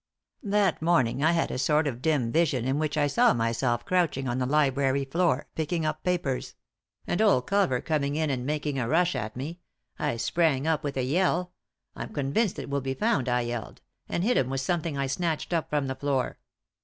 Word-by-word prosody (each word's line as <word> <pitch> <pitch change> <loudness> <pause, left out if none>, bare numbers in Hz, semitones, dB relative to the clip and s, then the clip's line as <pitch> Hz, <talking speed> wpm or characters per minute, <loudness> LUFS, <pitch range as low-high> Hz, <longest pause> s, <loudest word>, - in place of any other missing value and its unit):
" - - -47 0.2
That 195 -7 +2
morning 145 -6 +2
I 160 +2 +4
had 165 - 0
a - - -3
sort 150 +4 +2
of 125 -4 -3
dim 140 -7 +1
vision 140 -7 +1
in 135 +3 0
which 155 -1 -1
I 145 - +3
saw 235 - +3
myself 120 +1 0
crouching 165 -7 +1
on 120 +1 -1
the 125 - 0
library 140 -1 +2
Boor, 160 -1 +1
picking 160 +1 -1
up 155 0 -2
papers; 175 -8 -1 0.5
and 175 - 0
old 190 -13 +4
Culver 195 -11 +1
coming 145 -2 -1
in 155 -1 0
and 125 -2 -2
making 145 0 -2
a 120 - -1
rush 175 +1 +2
at 110 -4 -4
me, 150 +7 -5 0.4
I 115 - -1
sprang 145 +2 +1
up 160 -2 +1
with 140 -2 -3
a 130 - +1
yell 180 +5 +1 0.2
— - - -53
I'm - - -6
convinced 150 +10 0
it - - -5
will 140 0 -1
be 135 0 -3
found 210 - +1
I 125 0 +2
yelled 120 -2 -5
— - - -42
and 175 - -1
bit 245 +5 +2
him 130 - +1
with 135 0 -1
something 165 0 -1
I 140 - 0
snatched 160 +4 -2
up 165 -2 0
from 145 -2 0
the 130 - -2
floor. 135 -1 -2
145 Hz, 215 wpm, -27 LUFS, 130-165 Hz, 0.5 s, I